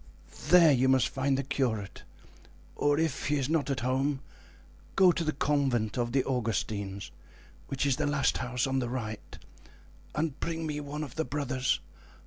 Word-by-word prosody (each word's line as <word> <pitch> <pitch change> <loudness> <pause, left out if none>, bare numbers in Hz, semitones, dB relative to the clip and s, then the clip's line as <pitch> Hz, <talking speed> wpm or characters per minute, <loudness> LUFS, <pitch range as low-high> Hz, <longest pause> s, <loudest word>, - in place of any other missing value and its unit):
There 170 -1 +7
you 130 -1 +3
must 130 -1 +4
find 135 0 0
the 135 - -1
curate, 120 -8 -2 0.7
or 145 0 +2
if 160 -4 -1
he 145 - +2
is 135 -3 0
not 155 -2 0
at 135 -1 -1
home, 135 +3 0 0.7
go 185 -2 +7
to 170 - -2
the 155 - +1
convent 135 -7 0
of 120 -1 -1
the 135 +1 +2
Augustines, 100 -5 -2 0.6
which 135 +1 -1
is 140 -3 +2
the 150 -1 0
last 145 -1 +1
house 125 -1 -1
on 135 0 0
the 120 -2 -2
right, 110 -4 -5 0.8
and 150 -2 -1
bring 165 -1 -3
me 150 -1 -3
one 150 +1 -5
of 135 -4 -7
the 160 - +1
brothers. 135 -4 -1
135 Hz, 170 wpm, -29 LUFS, 125-150 Hz, 0.8 s, There